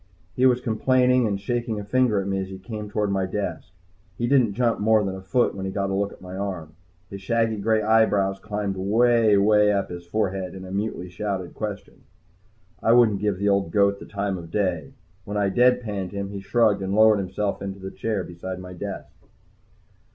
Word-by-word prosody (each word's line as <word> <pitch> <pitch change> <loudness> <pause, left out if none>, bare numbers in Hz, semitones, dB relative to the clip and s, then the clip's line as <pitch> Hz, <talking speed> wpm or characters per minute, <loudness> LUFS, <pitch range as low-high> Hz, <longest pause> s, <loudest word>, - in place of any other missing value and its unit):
He 130 +1 +4
was 125 -1 +2
complaining 125 +1 +2
and 100 -2 -2
shaking 115 +1 -2
a - - -5
finger 115 0 +2
at 95 - -3
me 95 0 -1
as 95 - -3
he 95 0 -8
came 105 +2 -7
toward 105 -1 -1
my 95 -1 0
desk. 95 -4 -4 0.5
He 120 - -1
didn't 120 -5 +3
jump 120 -1 +1
more 110 0 +3
than 95 -1 -2
a 95 - -8
foot 120 +6 +1
when 95 - -6
he - - -3
got 100 0 -2
a - - -1
look 100 +1 -1
at - - -15
my 90 0 -8
arm. 95 -5 -5 0.4
His 100 -1 -7
shaggy 115 +1 0
gray 110 +1 +1
eyebrows 105 -3 +2
climbed 105 -2 -3
way, 110 +2 +3
way 105 +1 +4
up 100 -2 -1
his 85 0 -7
forehead 95 0 -2
in 95 0 -8
a 95 - -9
mutely 100 -2 -3
shouted 95 0 -4
question. 105 -2 -6 0.8
I 115 - +4
wouldn't 115 -5 +4
give 105 -3 0
the 100 +2 +1
old 100 -3 +1
goat 100 0 +2
the - - -10
time 100 -2 -3
of 85 -1 -10
day. 85 -7 -1 0.3
When 105 +2 -4
I 100 -1 +2
dead 125 +5 +4
panned 100 -5 -4
him, 100 -1 -4
he 100 - -5
shrugged 105 0 +2
and 95 +1 -2
lowered 110 -1 +6
himself 100 +2 -2
into 100 0 -5
the 95 0 -7
chair 110 -4 -2
beside 90 +2 -7
my 90 0 -9
desk. 90 - -7
100 Hz, 210 wpm, -24 LUFS, 95-110 Hz, 0.8 s, lowered